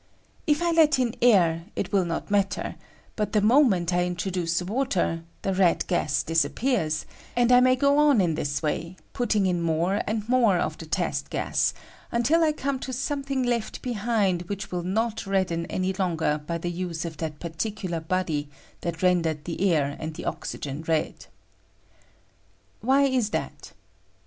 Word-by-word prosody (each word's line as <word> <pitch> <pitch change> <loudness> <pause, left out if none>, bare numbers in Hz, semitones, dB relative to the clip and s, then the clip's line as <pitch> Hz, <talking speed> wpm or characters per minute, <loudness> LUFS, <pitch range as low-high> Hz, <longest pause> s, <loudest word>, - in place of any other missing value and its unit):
If 300 +2 +2
I 340 - +2
let 320 -3 +5
in 245 -3 0
air, 170 -8 +4
it - - -3
will 195 -3 +2
not 170 +4 -4
matter; 200 -1 0 0.4
but 210 -1 -2
the 215 - +4
moment 210 - +4
I 175 0 +2
introduce 180 -1 -1
water, 190 -6 0 0.2
the 195 - 0
red 185 -2 +3
gas 155 -5 0
disappears; 165 - 0 0.3
and 245 0 +3
I 245 - +8
may 255 0 +5
go 280 +2 +3
on 295 -5 +5
in 175 -4 +2
this 145 -1 -2
way, 165 +4 -2 0.2
putting 220 -5 +1
in 180 -2 +1
more 170 +4 +1
and 215 0 -2
more 235 -6 +4
of 155 -2 -1
the 160 - -8
test - - -1
gas, - - 0 0.4
until 290 +8 +3
I 310 - +4
come 280 -3 -2
to 260 - -5
something 275 +1 -2
left 240 -2 -2
behind 210 -6 0
which 205 0 -5
will 180 -1 -2
not 215 +4 -1
redden 185 -4 0
any 185 +1 -1
longer 165 -5 0
by 170 - -1
the 175 +1 -3
use 175 -1 -4
of 160 -2 -6
that 155 -2 -5
particular 175 +1 -3
body 160 -3 -2 0.3
that 170 0 -4
rendered 165 -4 +1
the 180 +3 0
air 145 -3 +1
and 155 0 -5
the - - -7
oxygen 140 +1 -4
red. 160 -1 -2 1.5
Why 270 +4 +3
is 260 -6 +2
that - - -5
185 Hz, 165 wpm, -26 LUFS, 165-240 Hz, 1.5 s, I